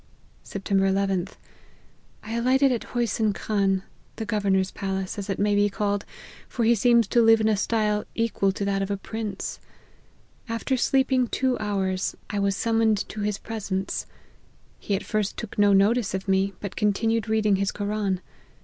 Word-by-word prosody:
" - - -33
Sept. 195 - -7
llth. 195 -1 +1 0.9
I 220 +1 -6
alighted 260 +3 +3
at 240 - -2
Hosyn 220 -3 +1
Khan, 195 -3 0 0.3
the 220 - -4
governor's 195 -3 +1
palace, 190 0 -3
as 200 - -6
it 195 - -1
may 205 +1 +2
be 205 0 +3
called, 205 0 -1 0.4
for 240 - -2
he 235 - +5
seems 235 +1 +4
to 240 - +4
live 225 0 +6
in 220 - +2
a 220 - +3
style 210 0 0
equal 225 -4 +1
to 200 - -3
that 195 0 0
of 195 - -2
a 200 - -1
prince. 210 -1 -5 0.9
After 230 +4 -1
sleeping 260 0 +2
two 260 +1 0
hours, 195 -3 -1 0.2
I 205 - -1
was 200 0 +1
summoned 225 -1 +1
to 215 - -5
his 205 -1 -1
presence. 200 -4 -4 0.7
He 200 - -1
at 195 - -3
first 215 -2 -2
took 220 -2 -6
no 205 0 +5
notice 200 +2 +3
of 190 +1 -5
me, 195 +1 +2
but 200 - -5
continued 225 +1 +1
reading 215 -2 +2
his 200 +1 0
Koran. 205 -2 -2
205 Hz, 170 wpm, -25 LUFS, 195-225 Hz, 0.9 s, live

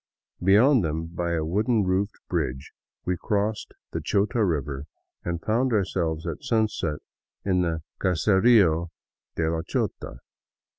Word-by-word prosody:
Beyond 110 +6 +5
them, 80 0 -2
by 85 +1 -3
a 80 -2 0
wooden 105 +6 +1
roofed 95 +3 0
bridge, 65 +1 -2 0.3
we 90 - +1
crossed 105 +2 -2 0.2
the - - -3
Chota 105 +3 +1
river 70 -6 -1 0.4
and 85 -1 -2
found 120 +3 +1
ourselves 85 -6 0
at 85 - -4
sunset 110 - 0 0.4
in 95 -2 +2
the 80 -2 -1
" - - -38
Caserio 95 -2 +4 0.5
de 80 - 0
la 80 0 0
Chota." 70 -6 -3
90 Hz, 135 wpm, -26 LUFS, 80-105 Hz, 0.5 s, Beyond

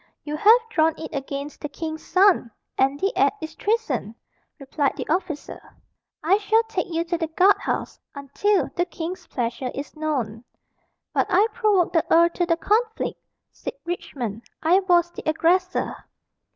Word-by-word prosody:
"You 300 0 -4
have 440 +10 +6
drawn 320 -1 +3
it 320 - -7
against 280 +1 -5
the 295 - -4
king's 315 +1 -6
son 370 -8 +4 0.3
and 270 +2 +1
the 390 +4 0
act - - +3
is 315 0 -6
treason," 300 - -1 0.4
replied 280 0 -1
the - - -4
officer. 340 -2 -2 0.6
"I 380 +6 +4
shall 435 +2 +3
take 445 -5 -3
you 330 0 0
to 340 0 -2
the 325 - -1
guard 370 +5 +4
house - - -3 0.2
until 285 +9 0
the 350 - +1
king's 350 +2 -6
pleasure 245 +1 -3
is 280 +3 -6
known." 255 -8 -2 0.7
"But - - +1
I 390 +3 +5
provoked 420 -6 +2
the 330 - +3
earl 335 +1 +6
to 350 0 -2
the 335 -1 +2
conflict," 445 +5 0 0.3
said - - -6
Richmond: 245 - -4 0.2
"I 345 +4 +5
was 350 -3 +3
the - - -8
aggressor." 360 +4 +1
335 Hz, 160 wpm, -24 LUFS, 290-375 Hz, 0.7 s, have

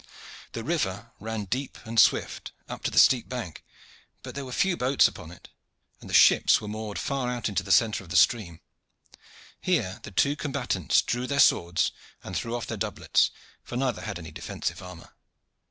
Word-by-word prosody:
The 115 - -5
river 115 - -2
ran 110 -1 -4
deep 130 +8 -4
and 115 0 0
swift - - +2
up - - -7
to - - +2
the - - -7
steep 125 -3 +5
bank; 120 -10 -6 0.6
but - - -8
there 140 -1 -5
were 130 - -8
few 190 +7 +1
boats 130 -1 +4
upon 80 - -10
it, 85 - -14 0.5
and - - -12
the - - -7
ships - - +6
were 105 - -8
moored 105 0 -5
far 135 -3 -2
out 125 -1 -2
in 105 - -4
the - - -2
centre 110 -5 +3
of 85 - -15
the 90 - -4
stream. 90 -5 +2 1.0
Here 95 +4 0
the 115 - -9
two 140 +9 +2
combatants 135 - 0
drew 125 +1 -2
their 140 +1 -1
swords 85 -8 +3 0.3
and - - -7
threw 115 +1 -2
off 120 - -4
their 115 - -5
doublets, 105 0 +1 0.3
for 120 - -6
neither 130 -3 -1
had 110 -4 -5
any 80 -2 -9
defensive - - -5
armor. - - -11
115 Hz, 185 wpm, -27 LUFS, 100-130 Hz, 1.0 s, ships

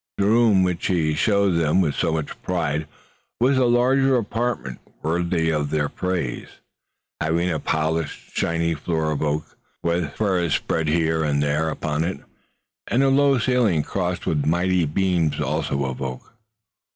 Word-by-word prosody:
The 100 - +1
room 110 -3 +4
which 90 -2 -1
he 80 -5 +1
showed 100 +4 +2
them 80 +2 +2
with 80 -6 +2
so 85 - 0
much 80 -2 -4
pride 75 +2 -1 0.5
was 130 +3 +3
a 130 - +3
large 125 +3 +3
apartment 120 - -1 0.2
worthy 85 0 0
of 75 -2 -1
their 75 -1 0
praise, 90 -9 -3 0.7
having 85 +3 +1
a 80 - -1
polished, 80 0 -2
shining 85 0 0
floor 80 -1 -1
of 75 - -2
oak, 75 0 -2 0.3
with 85 -3 0
furs 90 -7 +1
spread 80 -1 -1
here 80 0 +1
and 70 -1 +1
there 75 +2 0
upon 75 0 -2
it, 85 -4 -3 0.7
and 130 +3 +2
a 135 - +4
low 140 0 +4
ceiling 115 -10 +2
crossed 90 0 -3
with 75 -3 0
mighty 90 +3 +2
beams 80 -2 0
also 75 -1 -1
of 65 0 -5
oak. 65 - -6
85 Hz, 155 wpm, -23 LUFS, 75-95 Hz, 0.7 s, room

